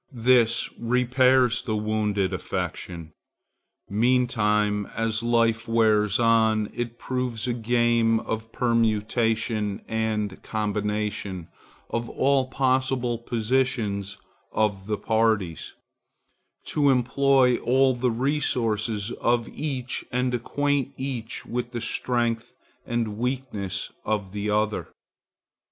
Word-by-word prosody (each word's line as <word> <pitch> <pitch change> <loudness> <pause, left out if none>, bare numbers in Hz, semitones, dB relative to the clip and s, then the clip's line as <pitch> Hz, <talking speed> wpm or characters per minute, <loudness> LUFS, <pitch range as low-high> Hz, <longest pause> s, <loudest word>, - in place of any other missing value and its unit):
This 120 -2 +4
repairs 125 0 +3
the 115 -4 -2
wounded 105 -2 0
affection. 85 -3 -4 0.7
Meantime, 105 -3 +1
as 110 0 0
life 115 -1 +1
wears 110 -3 +3
on, 110 -2 +3
it 120 -1 -4
proves 125 -3 -3
a 120 - +1
game 115 -1 +2
of 110 0 -5
permutation 110 -2 0
and 110 -3 -2
combination 105 -4 -3 0.4
of 115 0 -2
all 135 -1 +2
possible 130 -2 0
positions 115 -4 -1 0.3
of 105 -3 0
the 105 -1 -1
parties, 110 -8 0 0.9
to 145 -2 +2
employ 130 0 +3
all 130 +1 +3
the 125 0 0
resources 115 -5 0
of 120 -1 +2
each 130 -4 -3
and 125 0 0
acquaint 140 +2 -1
each 130 -4 -4
with 120 0 -4
the 120 - -2
strength 115 0 -1 0.3
and 115 -3 -2
weakness 120 -7 -3
of 100 -3 -2
the 105 +1 -3
other. 105 0 0
115 Hz, 100 wpm, -25 LUFS, 105-125 Hz, 0.9 s, This